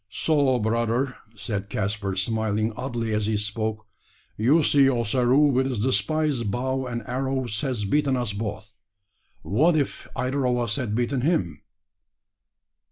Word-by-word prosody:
"So, 140 Hz, +1 st, +2 dB
brother," 115 Hz, +3 st, 0 dB, 0.2 s
said 100 Hz, 0 st, -4 dB
Caspar, 100 Hz, -1 st, -2 dB
smiling 110 Hz, +2 st, 0 dB
oddly 120 Hz, -2 st, -3 dB
as 105 Hz, -1 st, 0 dB
he 110 Hz, -1 st, +1 dB
spoke, 110 Hz, +1 st, -3 dB, 0.5 s
"you 140 Hz, +9 st, +3 dB
see 140 Hz, -2 st, +5 dB
Ossaroo 125 Hz, +3 st, +3 dB
with 130 Hz, +1 st, +2 dB
his 120 Hz, -6 st, -2 dB
despised 130 Hz, +1 st, 0 dB
bow 130 Hz, +4 st, -1 dB
and 120 Hz, -2 st, -4 dB
arrows 130 Hz, -3 st, -2 dB
has 125 Hz, -7 st, -2 dB
beaten 140 Hz, +4 st, +1 dB
us 120 Hz, -4 st, -2 dB
both. 105 Hz, 0 st, -5 dB, 0.7 s
What, 155 Hz, -, +3 dB
if 145 Hz, -3 st, -2 dB
either 130 Hz, +1 st, 0 dB
of 125 Hz, 0 st, +1 dB
us 115 Hz, -3 st, -1 dB
had 120 Hz, -6 st, -2 dB
beaten 125 Hz, +2 st, 0 dB
him?" 105 Hz, -, 0 dB
120 Hz, 140 wpm, -25 LUFS, 105-130 Hz, 0.7 s, see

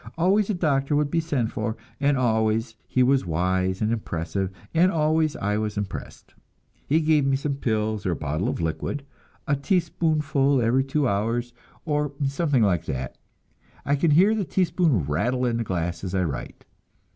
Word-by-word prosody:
Always 195 Hz, +5 st, +2 dB
a 210 Hz, -, +1 dB
doctor 145 Hz, -4 st, +1 dB
would 145 Hz, -1 st, +1 dB
be 170 Hz, -, +2 dB
sent 140 Hz, -8 st, -1 dB
for, 110 Hz, -, -3 dB, 0.2 s
and 140 Hz, -1 st, +2 dB
always 115 Hz, -1 st, +1 dB
he 130 Hz, -, +2 dB
was 135 Hz, +1 st, +3 dB
wise 95 Hz, +3 st, 0 dB
and 110 Hz, -, +1 dB
impressive, 95 Hz, -3 st, -2 dB, 0.2 s
and 175 Hz, +3 st, +4 dB
always 155 Hz, -1 st, +1 dB
I 105 Hz, +1 st, -1 dB
was 105 Hz, -1 st, -2 dB
impressed. 100 Hz, -2 st, -6 dB, 0.5 s
He 155 Hz, +3 st, +3 dB
gave 155 Hz, -2 st, +3 dB
me 135 Hz, 0 st, +2 dB
some 140 Hz, 0 st, -2 dB
pills 110 Hz, -4 st, -1 dB
or 90 Hz, -, +1 dB
a -, -, -2 dB
bottle 75 Hz, +4 st, -2 dB
of -, -, -3 dB
liquid, 85 Hz, -, -3 dB, 0.4 s
a 145 Hz, -, +2 dB
teaspoonful 150 Hz, -4 st, +1 dB
every 120 Hz, +3 st, +2 dB
two 135 Hz, +1 st, 0 dB
hours, 115 Hz, +4 st, -1 dB, 0.3 s
or 150 Hz, -2 st, -1 dB
something 140 Hz, -2 st, +1 dB
like 90 Hz, -5 st, +1 dB
that 65 Hz, -1 st, -5 dB, 0.7 s
I 140 Hz, -, +2 dB
can 155 Hz, +4 st, +2 dB
hear 185 Hz, +9 st, +5 dB
the 215 Hz, -2 st, 0 dB
teaspoon 170 Hz, -, +1 dB
rattle 120 Hz, -, 0 dB
in 120 Hz, -1 st, 0 dB
the 115 Hz, -, -1 dB
glass 85 Hz, -3 st, -3 dB
as 95 Hz, 0 st, -3 dB
I 95 Hz, -, +2 dB
write. 75 Hz, -6 st, -5 dB
130 Hz, 175 wpm, -25 LUFS, 105-150 Hz, 0.7 s, hear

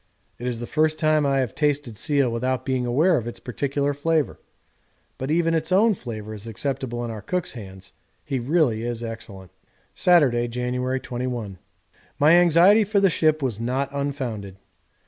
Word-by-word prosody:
It 120 Hz, -, -4 dB
is 120 Hz, -2 st, -3 dB
the 120 Hz, -, -4 dB
first 155 Hz, +3 st, +1 dB
time 155 Hz, -2 st, +2 dB
I 135 Hz, -1 st, +2 dB
have 125 Hz, -, -3 dB
tasted 145 Hz, -6 st, -1 dB
seal 140 Hz, +1 st, +1 dB
without 125 Hz, +2 st, -2 dB
being 130 Hz, -2 st, -1 dB
aware 155 Hz, +8 st, +3 dB
of 120 Hz, -3 st, -4 dB
its 120 Hz, -, -7 dB
particular 140 Hz, +3 st, -2 dB
flavour. 155 Hz, +1 st, 0 dB, 0.8 s
But 130 Hz, -, -4 dB
even 165 Hz, +1 st, +2 dB
its 160 Hz, +1 st, -1 dB
own 215 Hz, +4 st, +5 dB
flavour 110 Hz, -, -7 dB
is 105 Hz, +1 st, -8 dB
acceptable 120 Hz, +1 st, -3 dB
in 115 Hz, -, -5 dB
our 110 Hz, -2 st, -7 dB
cook's 180 Hz, -, -3 dB
hands 95 Hz, -4 st, -11 dB, 0.3 s
he 135 Hz, -3 st, -2 dB
really 125 Hz, -4 st, +1 dB
is 120 Hz, 0 st, -4 dB
excellent. 110 Hz, -5 st, -8 dB, 0.4 s
Saturday, 135 Hz, -10 st, +3 dB
January 125 Hz, +2 st, -2 dB
21. 120 Hz, -7 st, -5 dB, 0.6 s
My 150 Hz, +2 st, +5 dB
anxiety 175 Hz, +5 st, +6 dB
for 205 Hz, 0 st, +1 dB
the 195 Hz, -2 st, +4 dB
ship 155 Hz, -2 st, +2 dB
was 120 Hz, -5 st, -2 dB
not 130 Hz, +4 st, -1 dB
unfounded. 130 Hz, -9 st, -4 dB
130 Hz, 165 wpm, -23 LUFS, 120-155 Hz, 0.8 s, anxiety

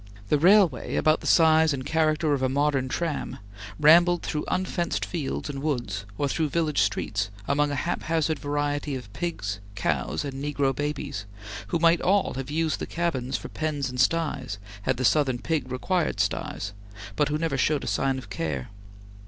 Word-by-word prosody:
The 150 Hz, -, +3 dB
railway, 180 Hz, -, +4 dB
about 155 Hz, 0 st, +3 dB
the -, -, -5 dB
size 160 Hz, -2 st, +5 dB
and 130 Hz, -1 st, -4 dB
character 155 Hz, -1 st, +2 dB
of 140 Hz, -, 0 dB
a 130 Hz, -, +2 dB
modern 140 Hz, -1 st, +1 dB
tram, 165 Hz, +1 st, -2 dB, 0.4 s
rambled 175 Hz, +3 st, +6 dB
through 150 Hz, -, -2 dB
unfenced 185 Hz, -2 st, -1 dB
fields 155 Hz, -7 st, -3 dB
and 140 Hz, -2 st, -5 dB
woods, 120 Hz, -10 st, -2 dB
or 145 Hz, -, +1 dB
through 155 Hz, +2 st, 0 dB
village 155 Hz, -6 st, +1 dB
streets, 100 Hz, 0 st, 0 dB, 0.2 s
among 145 Hz, +1 st, +2 dB
a 145 Hz, -, -2 dB
haphazard 160 Hz, 0 st, -1 dB
variety 145 Hz, 0 st, -1 dB
of 120 Hz, -6 st, -8 dB
pigs, 100 Hz, -, -3 dB, 0.2 s
cows, 85 Hz, -, -1 dB
and 135 Hz, 0 st, -5 dB
negro 140 Hz, -2 st, 0 dB
babies, 145 Hz, -9 st, -3 dB, 0.4 s
who -, -, 0 dB
might 165 Hz, 0 st, +4 dB
all 195 Hz, +2 st, +2 dB
have 135 Hz, +1 st, -5 dB
used 160 Hz, +1 st, 0 dB
the -, -, -4 dB
cabins 145 Hz, -7 st, -1 dB
for -, -, -8 dB
pens 145 Hz, -4 st, -2 dB
and 125 Hz, -, -6 dB
styes, 135 Hz, -7 st, 0 dB, 0.2 s
had 130 Hz, +4 st, 0 dB
the 130 Hz, -, 0 dB
Southern 135 Hz, -2 st, +3 dB
pig 135 Hz, -1 st, -2 dB
required 175 Hz, +7 st, 0 dB
styes, 95 Hz, +1 st, -2 dB, 0.4 s
but 150 Hz, -1 st, +2 dB
who 150 Hz, -, 0 dB
never 160 Hz, -3 st, -1 dB
showed 145 Hz, +2 st, +1 dB
a -, -, -5 dB
sign 135 Hz, -1 st, +1 dB
of 115 Hz, -6 st, -9 dB
care. 75 Hz, -8 st, -3 dB
145 Hz, 175 wpm, -26 LUFS, 130-160 Hz, 0.4 s, rambled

